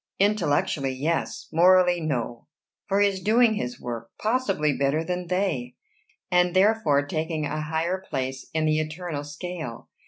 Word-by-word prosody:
"Intellectually, 150 -9 +1
yes; 155 +6 -2
morally, 180 +1 +5
no; 120 -6 -3 0.4
for 200 0 +2
he 205 - +6
is 195 -1 -3
doing 225 +3 +4
his 125 - -4
work, 115 -1 -6
possibly 205 - +1
better 140 +3 +1
than 180 +1 -3
they, 180 -9 -1 0.6
and 180 0 +3
therefore 185 -8 +3
taking 155 +1 -2
a 155 +1 -3
higher 160 +4 -1
place 130 0 -3
in 160 -1 0
the 155 0 +2
eternal 155 -1 -4
scale. 155 -3 -7
160 Hz, 145 wpm, -25 LUFS, 145-185 Hz, 0.6 s, he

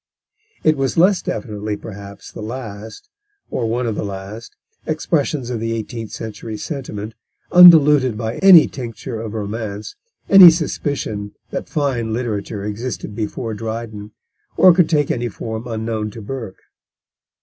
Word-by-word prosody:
It 155 -1 +3
was 135 +2 -1
less 185 +3 +4
definitely, 105 -3 -4
perhaps, 100 -2 -10
the - - -9
last, 110 - -8 0.4
or 115 - -1
one 120 +2 -1
of 115 - -1
the - - -4
last, 100 +3 -8 0.3
expressions 150 -4 -1
of 120 - -3
the 115 0 -2
eighteenth 115 0 -5
century 110 0 -7
sentiment, 110 -6 -6 0.4
undiluted 150 -9 +7
by 110 0 -4
any 190 -5 +8
tincture 120 -2 -7
of 110 -1 -6
romance, 105 0 -5 0.3
any 195 -3 +10
suspicion 140 - -3 0.2
that - - -5
fine 125 -7 -1
literature 105 -3 -3
existed 105 0 -5
before 110 +1 -4
Dryden, 110 -1 -6 0.5
or 185 - +7
could 170 -2 +3
take 150 -3 +1
any 120 0 -2
form 110 +3 -6
unknown 110 -1 -3
to 110 +2 -10
Burke. 115 -4 -6
115 Hz, 140 wpm, -19 LUFS, 105-135 Hz, 0.5 s, any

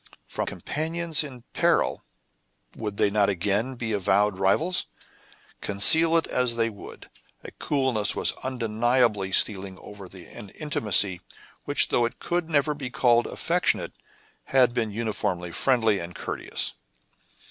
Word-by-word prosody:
From - - -5
companions 160 0 -2
in 130 -5 -10
peril, - - +1 0.7
would 105 -2 -6
they 100 - +2
not 100 -1 +2
again 100 +7 -1
be 115 -2 -4
avowed 100 0 +1
rivals? 155 - 0 0.7
Conceal 160 +12 +6
it 165 - 0
as 125 -2 -1
they 115 -1 0
would, 100 - -12 0.4
a - - -10
coolness 130 -8 -1
was - - +1
undeniably 115 -4 0
stealing 95 -1 +2
over 100 0 -12
an 95 +2 -12
intimacy 105 - 0 0.4
which, - - +5
though 120 - +1
it 115 - -5
could 175 -1 -3
never 150 -1 +1
be 140 -3 -7
called 120 -1 +2
affectionate, - - -1 0.5
had 130 -3 +3
been 115 -3 -1
uniformly 100 -5 -3
friendly 115 -2 +1
and 85 +1 -8
courteous. - - -3
115 Hz, 130 wpm, -25 LUFS, 100-130 Hz, 0.7 s, Conceal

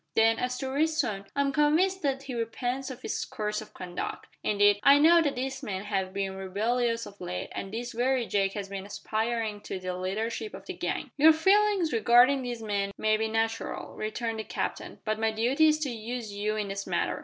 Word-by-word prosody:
Then, 225 0 +4
as 250 0 -1
to 265 0 -3
Ritson, 280 -9 0
I 280 - +2
am 280 0 +1
convinced 320 +6 +3
that 275 -3 -1
he 270 -2 -6
repents 245 +3 -2
of 255 -1 -9
his - - -2
course 210 -5 -3
of 215 - -13
conduct. 180 -1 -5 0.2
Indeed, 205 -1 +4
I 280 +1 +7
know 335 +3 +6
that 290 -5 -1
his 265 +1 -3
men 195 -7 -4
have 190 -3 -2
been 195 0 -3
rebellious 230 +5 0
of 200 - -13
late, 180 0 -4
and 195 - -5
this 240 +2 -4
very 250 +1 +1
Jake 195 -2 +1
has 200 -2 -4
been 195 0 -6
aspiring 220 0 -2
to - - -5
the 185 0 -4
leadership 220 - -3
of - - -11
the - - -5
gang." - - -3
"Your 315 +2 +8
feelings 385 0 +3
regarding 245 +4 +5
these 240 -2 -5
men 200 -2 -1
may 215 0 +2
be 220 +1 0
natural," 225 +1 -2
returned 225 +1 -3
the - - -2
captain, - - -4
"but 215 0 -1
my 225 0 +2
duty 245 +8 +3
is 305 0 +4
to 280 -4 -1
use 230 -1 -5
you 210 +1 -1
in 210 -2 -2
this 195 0 -4
matter. - - -1
225 Hz, 210 wpm, -28 LUFS, 205-265 Hz, 0.2 s, Your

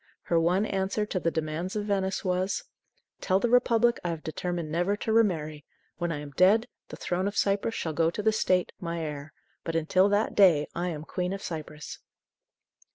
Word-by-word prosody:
Her 170 - +2
one 180 +5 +2
answer 195 +1 -1
to 200 -3 -2
the 165 - +1
demands 160 +4 -3
of 210 -1 -2
Venice 195 -2 -1
was: 185 +2 0 0.6
"Tell 190 0 +2
the 235 +3 0
Republic 240 -1 +4
I 175 - -1
have 165 -2 -4
determined 170 0 -3
never 175 +5 0
to 220 - -2
remarry. 155 -9 +1 0.4
When 175 -1 -1
I 150 -2 -3
am 145 -1 -8
dead, 195 - +4 0.2
the - - -7
throne 185 +2 -1
of 205 - -4
Cyprus 200 +3 +1
shall 160 - -3
go 165 +1 +2
to 205 +5 -4
the 220 0 +3
State, 185 -4 +1
my 170 -1 -4
heir. 150 0 -6 0.3
But 165 - -4
until 185 +5 +3
that 205 +2 +1
day 170 -7 +5
I 175 +1 -2
am 155 -4 -4
Queen 180 +3 -3
of 195 - -6
Cyprus!" 155 -2 -7
180 Hz, 195 wpm, -28 LUFS, 165-200 Hz, 0.6 s, day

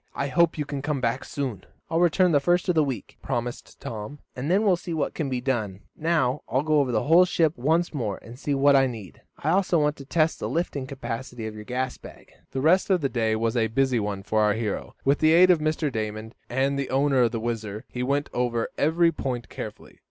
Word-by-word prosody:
I 140 - -2
hope 170 +5 +3
you 150 - -2
can 140 -1 -4
come 145 0 -1
back 125 +1 -1
soon." 135 -8 -4 0.2
"I'll 165 - 0
return 175 +1 +4
the 145 - +4
first 175 +5 +1
of 180 - +3
the 160 -2 +3
week," 130 -8 -5
promised 120 -2 -4
Tom, 110 +6 -6 0.2
"and 130 +4 -3
then 195 +4 +3
we'll 195 -4 +4
see 170 -1 -5
what 155 - -1
can 150 -4 -3
be 125 -2 -2
done. 110 -7 -2
Now 155 -5 +1
I'll 130 +4 +1
go 155 -1 +3
over 135 -3 +1
the 110 -3 +1
whole 165 +4 +6
ship 165 -3 +1
once 160 +8 +1
more, 110 -9 -2
and 120 +3 -11
see 145 -1 -1
what 140 +1 +5
I 135 -1 +5
need. 110 -8 -9 0.2
I - - -1
also 185 -2 +2
want 150 -1 +1
to 140 - -10
test 160 +2 +1
the - - -3
lifting 145 -5 -2
capacity 125 -3 -6
of 110 - -5
your 105 0 -9
gas 125 +1 -3
bag." - - -13 0.2
The 130 - -3
rest 180 +8 +3
of 185 -3 +3
the 135 - 0
day 110 -3 0
was 115 +1 -1
a 115 -2 +2
busy 130 +2 +1
one 100 -2 -3
for 110 +2 +1
our 105 -1 +3
hero. 110 -1 -4
With 140 +1 +3
the 155 0 +4
aid 180 +2 +7
of 175 - +3
Mr. 155 -1 0
Damon 110 0 -4 0.2
and 135 +3 0
the 135 - -3
owner 135 0 +2
of 120 - +3
the 115 - -2
WHIZZER, 110 -2 -4
he 125 - -5
went 140 +3 0
over 120 -2 -1
every 165 +3 +3
point 125 -6 -4
carefully. - - -9
135 Hz, 240 wpm, -25 LUFS, 115-155 Hz, 0.2 s, aid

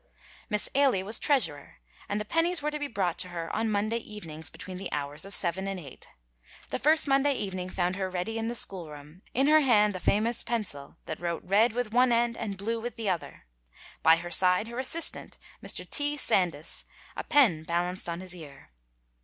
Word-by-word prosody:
Miss 210 -2 -1
Ailie 265 -9 +3
was 215 +3 +2
treasurer, 165 - 0 0.3
and 205 - -1
the 210 - -4
pennies 330 +7 +2
were 300 - 0
to 300 - -4
be 290 - -2
brought 190 -9 -2
to 180 - -1
her 170 -2 -5
on 225 +1 0
Monday 215 +2 0
evenings 160 -9 -8
between 185 -1 -9
the 195 - -5
hours 145 +2 -3
of 200 - -5
seven 190 +2 +1
and 195 -1 -3
eight. 140 -7 -12 0.6
The - - -1
first 310 +2 +3
Monday 275 +1 +3
evening 185 -4 -3
found 180 0 -1
her 190 -1 -2
ready 185 +5 -3
in 225 - -2
the 240 - -3
school 180 -7 +4
room, 150 +4 -12
in 270 +3 +4
her 310 +2 +6
hand 210 -7 +4
the 185 - -5
famous 220 +6 +1
pencil 185 -11 -4
that 155 - -5
wrote 170 -1 -3
red 210 +5 +3
with 245 -2 -2
the - - -7
one 250 0 +5
end 235 0 +2
and 205 -4 -4
blue 225 +4 -2
with 240 +2 -5
the 225 -4 -2
other; 175 - -5 0.6
by 160 - +7
her 175 +1 -7
side 180 +4 +3
her 235 +1 -5
assistant, 320 +6 -2 0.3
Mr. - - -2
T. 290 0 0
Sandys, 175 - 0 0.3
a - - -4
pen 230 - +4
balanced 175 +2 -1
on 170 +1 -4
his 185 -1 -7
ear. 140 - -12
200 Hz, 205 wpm, -28 LUFS, 175-235 Hz, 0.6 s, by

